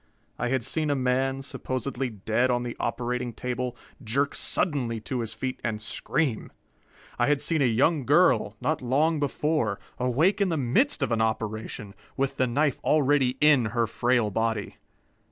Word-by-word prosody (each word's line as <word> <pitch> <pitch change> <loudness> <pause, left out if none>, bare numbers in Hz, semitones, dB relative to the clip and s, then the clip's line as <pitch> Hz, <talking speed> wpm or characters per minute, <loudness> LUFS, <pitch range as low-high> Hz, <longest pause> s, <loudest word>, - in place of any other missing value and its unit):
I 125 - 0
had 130 -1 0
seen 150 +4 +1
a 145 - +2
man, 130 +1 0
supposedly 130 -1 -3
dead 110 +4 0
on 120 -1 +1
the 120 -1 -5
operating 120 0 -2
table, 125 +1 -4 0.3
jerk 135 +6 0
suddenly 125 - 0
to 125 +3 -3
his 115 -1 -4
feet 130 +3 -4
and 110 -2 -2
scream. 130 +3 -2 0.7
I 120 - +3
had 145 -1 +2
seen 160 0 +2
a - - +4
young 130 +4 +2
girl, 130 - +4
not 155 +5 -1
long 150 +6 +1
before, 145 -7 0 0.2
awake 155 - +2
in 195 - +3
the 165 - 0
midst 140 - +2
of 130 - -1
an 115 -1 +1
operation, 110 -2 -3 0.2
with 135 0 -1
the 130 - +2
knife 140 +3 +1
already 140 -3 +2
in 150 -5 +5
her 115 - +3
frail 120 -1 +1
body. 110 0 -2
125 Hz, 165 wpm, -26 LUFS, 115-145 Hz, 0.7 s, in